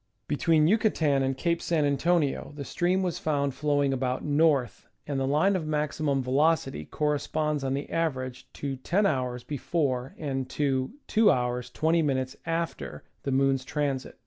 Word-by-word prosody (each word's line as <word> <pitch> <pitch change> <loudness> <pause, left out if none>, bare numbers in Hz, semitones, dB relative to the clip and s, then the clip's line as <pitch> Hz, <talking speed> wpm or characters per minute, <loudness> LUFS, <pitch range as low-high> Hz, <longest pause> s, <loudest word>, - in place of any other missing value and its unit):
Between 160 -2 +3
Yucatan 165 - +2
and 135 0 0
Cape 170 +3 0
San 160 -3 +1
Antonio 145 +1 +1
the 140 -1 -6
stream 185 +5 +1
was 180 -3 -2
found 140 -3 0
flowing 145 -1 +1
about 130 -1 -1
north, 145 -4 +2 0.2
and 140 -2 -2
the 135 - 0
line 155 +8 +3
of 165 -4 -2
maximum 150 -2 0
velocity 135 - +1
corresponds 150 - -1
on 135 0 0
the 140 - -4
average 130 -6 -2
to 135 -2 -4
lO'' 135 -11 +2
before 135 -3 -1
and 135 -3 -3
to 135 -3 0 0.2
2'^ 125 - +2
20"' 155 -5 +2 0.2
after 165 0 -3 0.2
the 140 - -3
moon's 135 0 +2
tran 145 -1 -1
sit. - - -13
145 Hz, 145 wpm, -27 LUFS, 135-160 Hz, 0.2 s, Between